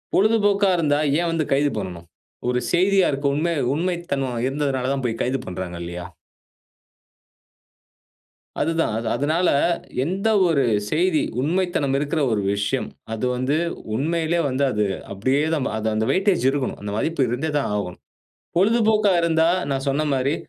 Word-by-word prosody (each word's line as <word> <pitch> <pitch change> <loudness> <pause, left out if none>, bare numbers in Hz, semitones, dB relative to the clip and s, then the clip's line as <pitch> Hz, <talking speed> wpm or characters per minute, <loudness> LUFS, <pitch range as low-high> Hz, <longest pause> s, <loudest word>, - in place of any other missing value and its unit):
பொழுதுபோக்கா 205 -2 +3
இருந்தா 145 -3 +2 0.2
ஏன் 170 -1 0
வந்து 165 -1 0
கைது 140 +1 +3
பண்ணனும். 90 -4 -6 0.4
ஒரு 125 0 +1
செய்தியா 190 +2 +3
இருக்கும் 140 0 0
உண்மை 170 +3 0 0.2
உண்மைத்தன்மை 165 -6 -2 0.2
இருந்ததனால 135 -2 -1
தான், 135 - -3
போய் 115 -1 -2
கைது 130 +2 0
பண்றாங்க 90 -1 -5
இல்லையா? 90 +1 -6 2.5
அதுதான். 165 -8 0
அது 115 0 -3
அதனால, 155 +7 +1 0.5
எந்த 195 +8 -1 0.2
ஒரு 145 -5 +2 0.3
செய்தி 165 0 +2 0.2
உண்மைத்தனம் 160 -3 0
இருக்கிற 150 +2 -1
ஒரு 105 - +1
விஷயம். 105 +6 -1 0.3
அது 115 +3 -2
வந்து, 130 +5 0 0.4
உண்மையிலே 165 +4 0
வந்து 130 +2 0
அது 105 -1 +1 0.3
அப்படியே 130 +9 +1
தான். 145 -4 0
அது 110 0 -2
அந்த 110 +1 +1
வெய்டேஜ் 190 -7 +2
இருக்குணும். 140 -2 -2
அந்த 105 - -5
வாய்ப்பு 150 +1 0
இருந்தே 140 +6 -2
தான் 140 - -1
ஆகும். 90 -3 -4 0.6
பொழுதுபோக்கா 215 0 +3
இருந்தா, 165 0 +3 0.2
நான் 135 +1 -2
சொன்ன 150 +3 0
மாரி 135 +3 +1
145 Hz, 140 wpm, -22 LUFS, 130-170 Hz, 2.5 s, பொழுதுபோக்கா